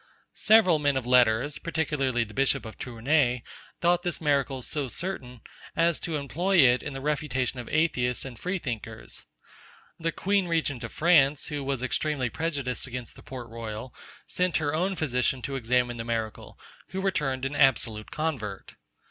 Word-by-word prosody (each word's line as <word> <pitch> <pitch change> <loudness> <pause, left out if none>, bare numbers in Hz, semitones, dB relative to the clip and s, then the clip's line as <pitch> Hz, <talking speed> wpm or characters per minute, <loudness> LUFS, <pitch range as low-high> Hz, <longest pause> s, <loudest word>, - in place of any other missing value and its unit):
Several 210 -7 +5
men 145 -2 +2
of 130 - -2
letters, 125 +2 +3
particularly 150 -7 0
the 105 -1 -11
bishop 135 -1 +1
of 110 - -8
Tournay, 125 0 +1 0.4
thought 175 0 +3
this 175 -2 -2
miracle 140 -4 +1
so 145 0 -2
certain, 130 -6 -4 0.3
as 170 -1 +3
to 165 - -3
employ 170 +7 0
it 125 -5 +6
in 145 - -5
the 135 - -6
refutation 135 -4 -1
of 120 - -7
atheists 125 -7 +1
and 125 -4 -8
free 185 +2 -1
thinkers. 125 - -5 0.7
The 165 0 0
queen 195 +2 +1
regent 155 -7 0
of 115 - -5
France, 150 -4 +4
who 145 -1 -3
was 135 -2 -2
extremely 130 -2 -1
prejudiced 145 -7 -2
against 125 -2 -7
the - - -13
Port 125 -3 -8
Royal, 115 +1 -6 0.3
sent 180 -1 +1
her 150 -1 -1
own 185 +5 0
physician 125 -4 0
to 135 +4 -3
examine 125 -1 +1
the 115 - -3
miracle, 115 -2 -4 0.3
who 190 - -5
returned 150 -9 0
an 140 +2 -2
absolute 115 -6 +2
convert. 130 -11 -3
135 Hz, 165 wpm, -27 LUFS, 125-160 Hz, 0.7 s, it